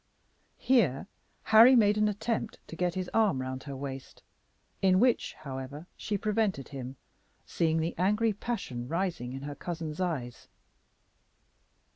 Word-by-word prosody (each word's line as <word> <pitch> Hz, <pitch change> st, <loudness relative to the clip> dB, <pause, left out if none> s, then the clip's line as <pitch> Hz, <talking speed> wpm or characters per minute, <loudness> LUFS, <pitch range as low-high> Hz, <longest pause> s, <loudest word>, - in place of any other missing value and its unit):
Here 195 Hz, -, +2 dB, 0.4 s
Harry 230 Hz, +4 st, +8 dB
made 210 Hz, -3 st, +5 dB
an 215 Hz, 0 st, +2 dB
attempt 220 Hz, +2 st, -2 dB
to -, -, -9 dB
get 175 Hz, 0 st, -1 dB
his 185 Hz, -1 st, -2 dB
arm 215 Hz, -11 st, +3 dB
round 130 Hz, +1 st, -5 dB
her 140 Hz, -2 st, -6 dB
waist, 135 Hz, -1 st, -7 dB, 0.6 s
in 185 Hz, -1 st, +4 dB
which, 245 Hz, +1 st, +2 dB
however, 140 Hz, +1 st, -7 dB
she 210 Hz, -, -2 dB
prevented 210 Hz, -, -1 dB
him, 130 Hz, -2 st, -7 dB, 0.5 s
seeing 160 Hz, -1 st, 0 dB
the 165 Hz, +2 st, -1 dB
angry 210 Hz, +4 st, +2 dB
passion 195 Hz, -, -4 dB
rising 170 Hz, -6 st, -2 dB
in 135 Hz, +1 st, -7 dB
her 145 Hz, 0 st, -5 dB
cousin's 160 Hz, +1 st, -5 dB
eyes. 135 Hz, -10 st, -3 dB
175 Hz, 135 wpm, -29 LUFS, 135-210 Hz, 0.6 s, Harry